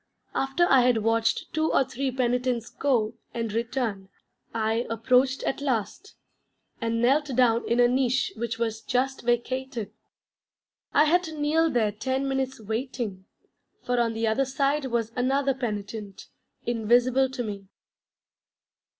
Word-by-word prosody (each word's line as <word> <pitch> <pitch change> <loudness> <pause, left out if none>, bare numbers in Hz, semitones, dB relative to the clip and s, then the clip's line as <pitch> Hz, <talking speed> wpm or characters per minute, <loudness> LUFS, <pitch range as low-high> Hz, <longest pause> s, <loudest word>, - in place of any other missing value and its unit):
After 270 +6 +1
I 270 -5 +6
had 240 -3 +2
watched 225 0 +1
two 315 +1 +1
or - - +4
three 265 +1 -3
penitents 250 -2 -1
go, 240 -6 +1 0.2
and 230 -3 -2
return, 230 -4 -2 0.4
I 225 +1 0
approached 250 +4 +2
at 270 - -2
last, 275 - -2 0.7
and 230 0 0
knelt 280 +5 +4
down 235 -2 +3
in 235 - +2
a 245 - +6
niche 255 +1 +1
which 230 0 -3
was 225 -1 -2
just 265 +1 -1
vacated. 240 -1 -2 1.0
I 295 - +5
had 340 +4 +4
to 320 -1 -7
kneel 320 +3 +2
there 230 -7 +1
ten 260 +6 -2
minutes 265 -1 -2
waiting, 220 -3 -4 0.6
for 245 0 0
on 230 -1 +1
the 225 0 -1
other 220 +5 +2
side 275 +2 0
was 230 -2 -1
another 270 +2 +1
penitent, 210 -4 -5 0.4
invisible 245 +3 +3
to 260 -1 -4
me. 200 -3 -6
245 Hz, 140 wpm, -26 LUFS, 225-265 Hz, 1.0 s, I